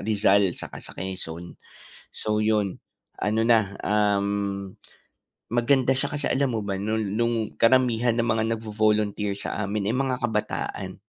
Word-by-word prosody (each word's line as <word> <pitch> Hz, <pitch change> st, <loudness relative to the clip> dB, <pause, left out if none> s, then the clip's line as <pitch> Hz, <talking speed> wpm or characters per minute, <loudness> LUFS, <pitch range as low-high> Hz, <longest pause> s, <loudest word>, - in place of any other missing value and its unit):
Rizal 100 Hz, -3 st, +3 dB
saka -, -, -7 dB
sa -, -, -10 dB
Quezon. 85 Hz, -2 st, -6 dB, 0.6 s
So 105 Hz, 0 st, -1 dB
yun 105 Hz, -3 st, +1 dB, 0.4 s
ano 110 Hz, +2 st, 0 dB
na, 110 Hz, -4 st, +3 dB
um, 100 Hz, -2 st, 0 dB, 0.8 s
maganda 130 Hz, +2 st, +2 dB
siya 140 Hz, +1 st, -2 dB
kasi 145 Hz, 0 st, -1 dB
alam 135 Hz, -1 st, +1 dB
mo 115 Hz, -, -1 dB
ba 100 Hz, -1 st, -2 dB
nol 110 Hz, +3 st, -1 dB
nung 115 Hz, -1 st, 0 dB
karamihan 120 Hz, -1 st, +3 dB
ng -, -, +3 dB
mga 110 Hz, -1 st, +2 dB
nagvo-volunteer 105 Hz, -2 st, 0 dB
sa 105 Hz, -, -3 dB
amin 100 Hz, 0 st, -2 dB
ay 115 Hz, -, +1 dB
mga 130 Hz, -1 st, 0 dB
kabataan. 105 Hz, -4 st, -2 dB
105 Hz, 140 wpm, -25 LUFS, 100-115 Hz, 0.8 s, Rizal